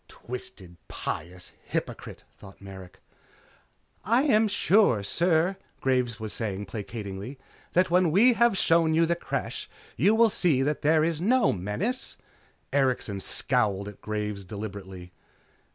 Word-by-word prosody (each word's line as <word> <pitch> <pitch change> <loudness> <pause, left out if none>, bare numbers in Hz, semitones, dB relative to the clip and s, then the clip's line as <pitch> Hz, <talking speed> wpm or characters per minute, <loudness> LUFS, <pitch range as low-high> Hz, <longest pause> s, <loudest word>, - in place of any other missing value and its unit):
Twisted, 95 -8 -9
pious, 90 +1 -6
hypocrite! - - -5 0.2
thought 95 -1 -14
Merrick. 95 -1 -11 1.1
"I 235 +6 +3
am 220 -7 +4
sure, 200 - +3
sir," 170 - +1 0.2
Graves 125 -4 0
was 110 -1 -5
saying 105 -3 -3
placatingly, 105 +3 -7 0.4
"that 180 -1 +2
when 180 -1 +4
we 220 +10 +5
have 235 -3 +3
shown 165 -2 +3
you 165 +1 +4
the 170 +1 +1
Creche 170 - -4 0.3
you 195 - +4
will 230 -1 +5
see 155 -9 +2
that 150 +2 -1
there 155 +1 +3
is 165 -1 -1
no 250 +7 +3
menace." 135 - -2 0.6
Erikson 130 -7 0
scowled 105 -3 0
at 105 -1 -10
Graves 105 -2 -4
deliberately. 95 -3 -8
130 Hz, 130 wpm, -27 LUFS, -, 1.1 s, we